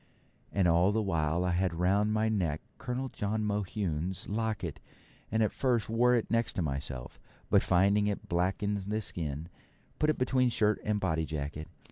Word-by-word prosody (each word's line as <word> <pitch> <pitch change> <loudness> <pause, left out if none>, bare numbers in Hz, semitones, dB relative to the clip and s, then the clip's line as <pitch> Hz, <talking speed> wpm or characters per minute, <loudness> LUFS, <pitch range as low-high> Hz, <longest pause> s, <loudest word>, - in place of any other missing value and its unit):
And 95 -3 +2
all 85 +3 +4
the 110 - +1
while 85 -2 0
I 90 - +1
had 90 0 +1
round 100 +5 +2
my 110 +1 +2
neck 90 -9 0 0.2
Colonel 130 +1 -3
John 110 0 -2
Mohune's 95 -4 -2
locket, 105 -6 -2 0.5
and 110 +1 +3
at 105 - +1
first 120 -5 0
wore 125 +2 +4
it 115 - -1
next 115 -3 +1
myself, 70 -5 -4 0.3
but - - +6
finding 100 +3 +3
it 105 +1 -3
black 90 0 +1
the 105 +1 -1
skin, 80 -5 -4 0.5
put 155 - +3
it 155 - +2
between 130 0 +2
shirt 105 -2 +1
and 105 -1 0
body 80 -5 0
jacket. 75 0 -4
100 Hz, 165 wpm, -31 LUFS, 85-110 Hz, 0.5 s, but